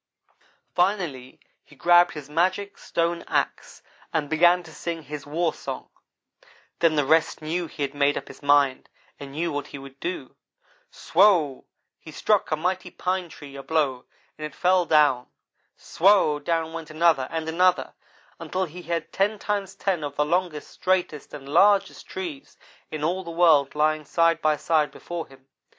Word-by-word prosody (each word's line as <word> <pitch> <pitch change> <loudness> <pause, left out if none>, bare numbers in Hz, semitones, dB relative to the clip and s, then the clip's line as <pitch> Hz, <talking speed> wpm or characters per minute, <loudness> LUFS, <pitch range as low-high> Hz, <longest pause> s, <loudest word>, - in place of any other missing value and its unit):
Finally 175 -9 -1 0.2
he 150 - -19
grabbed 175 +4 +4
his 150 -2 -8
magic 185 +6 0
stone 170 0 -1
axe, - - -2 0.3
and 155 -2 -2
began 175 +3 +4
to 160 -2 -13
sing 165 +1 -5
his 145 0 -8
warsong. 165 +2 -3 0.9
Then 165 -2 +3
the 145 -2 +2
rest 160 +3 +2
knew 170 +2 -2
he 145 - -5
had 140 0 -3
made 145 0 +2
up - - -6
his - - -13
mind 145 -2 +2 0.3
and 140 -1 -8
knew 165 +3 -2
what 145 -1 -4
he - - -9
would 135 0 -12
do. 170 -7 -5 0.5
Swow! 170 -8 +2 0.3
he 160 - -12
struck 210 +6 +1
a 155 - +1
mighty 180 +4 -2
pine 185 -1 -2
tree 145 -3 -12
a 135 - -7
blow, 140 -4 -1 0.3
and 155 - -4
it 150 - -16
fell 180 -1 +3
down. 145 -5 +3 0.5
Swow! 170 -4 +3
down 165 +1 -1
went 165 -2 -7
another 155 -4 +2
and 160 -1 -4
another, 180 +2 +2 0.5
until 185 +1 -2
he 175 +2 -10
had 170 -1 -4
ten 205 +2 +1
times 200 -2 -3
ten 190 -5 -1
of 145 -1 -5
the 150 - +1
longest, 170 -1 -1
straightest, 180 -5 -1
and 140 -2 -9
largest 195 +6 +3
trees 175 -7 -7 0.3
in 155 -1 -5
all 180 +4 0
the 170 - -8
world 160 -5 +4
lying 155 0 +1
side 165 +3 +2
by 155 -1 +2
side 155 0 +1
before 175 -1 -7
him. 135 0 -19
160 Hz, 165 wpm, -25 LUFS, 145-180 Hz, 0.9 s, grabbed